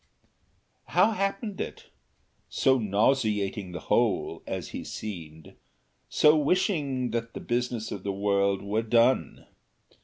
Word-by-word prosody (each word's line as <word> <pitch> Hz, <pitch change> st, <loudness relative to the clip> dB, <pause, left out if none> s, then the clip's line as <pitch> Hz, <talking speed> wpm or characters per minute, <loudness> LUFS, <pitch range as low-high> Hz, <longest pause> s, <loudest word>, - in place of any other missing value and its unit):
How 225 Hz, -, +3 dB
happened 195 Hz, 0 st, -2 dB
it? -, -, -7 dB, 0.6 s
so 130 Hz, -1 st, +3 dB
nauseating 105 Hz, -3 st, +1 dB
the 90 Hz, -2 st, -6 dB
whole, -, -, 0 dB
as -, -, -4 dB
he -, -, -6 dB
seemed, 80 Hz, -7 st, -8 dB, 0.6 s
so 150 Hz, +1 st, +5 dB
wishing 150 Hz, -, +1 dB
that 115 Hz, 0 st, -3 dB
the -, -, -4 dB
business 120 Hz, -2 st, -2 dB
of 100 Hz, -, -5 dB
the 100 Hz, -, -2 dB
world 100 Hz, 0 st, +1 dB
were 105 Hz, +2 st, 0 dB
done! 115 Hz, +3 st, +2 dB
115 Hz, 120 wpm, -27 LUFS, 100-135 Hz, 0.6 s, so